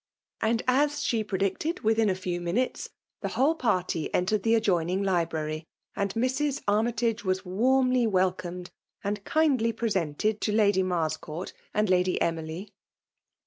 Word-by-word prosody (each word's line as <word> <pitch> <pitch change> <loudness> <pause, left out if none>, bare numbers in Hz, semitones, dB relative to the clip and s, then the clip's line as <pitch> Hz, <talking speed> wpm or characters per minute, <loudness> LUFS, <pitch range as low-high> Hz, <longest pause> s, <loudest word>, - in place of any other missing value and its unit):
And, 225 +1 +1
as 290 +3 +2
she 225 -2 +1
predicted, 200 - -1
within 220 0 +3
a 185 - +1
few 180 -2 -3
minutes 210 +10 -1 0.3
the - - -2
whole 285 +5 +2
party 185 - -1
entered 200 +3 +1
the 225 +2 +3
adjoining 185 -3 +1
library; 160 -4 -1 0.3
and 200 -1 -1
Mrs. 265 +4 0
Armytage 225 +2 +1
was 185 0 -1
warmly 255 +5 +2
welcomed 180 -2 -1 0.3
and 205 0 -2
kindly 275 -7 +2
presented 210 -2 -1
to 210 - 0
Lady 205 -3 +3
Marscourt 165 -1 -2 0.2
and 210 +1 +1
Lady 185 0 +2
Emily. 165 +3 -3
205 Hz, 135 wpm, -27 LUFS, 180-230 Hz, 0.3 s, within